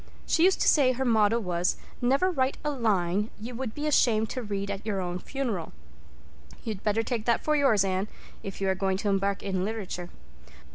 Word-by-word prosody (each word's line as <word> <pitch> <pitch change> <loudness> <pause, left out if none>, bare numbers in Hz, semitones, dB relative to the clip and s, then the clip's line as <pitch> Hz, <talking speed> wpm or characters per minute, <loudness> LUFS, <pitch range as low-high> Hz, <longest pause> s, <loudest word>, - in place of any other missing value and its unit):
She 330 - +3
used 380 - +3
to - - +3
say 265 -4 +5
her 265 +2 -2
motto 220 -2 +4
was 180 -4 0 0.2
'Never 275 +10 +3
write 265 -4 0
a 300 - +1
line 210 -5 +1
you 230 +4 -7
would 240 -2 -4
be 295 - -3
ashamed 225 -7 +3
to 255 - -3
read 200 -2 -3
at 200 +1 -5
your 210 -3 -2
own 180 -1 -3
funeral.' 235 - -3 0.9
You'd 215 -4 -4
better 220 +1 +1
take 225 -1 -3
that 235 -1 +2
for 305 - +2
yours, 235 -9 +4
Anne, 190 +1 -1 0.3
if 195 - -7
you 195 - 0
are - - +3
going 190 0 0
to 205 +1 -1
embark 195 0 0
in 190 -2 -1
literature. 195 -4 -4
215 Hz, 200 wpm, -28 LUFS, 195-255 Hz, 0.9 s, say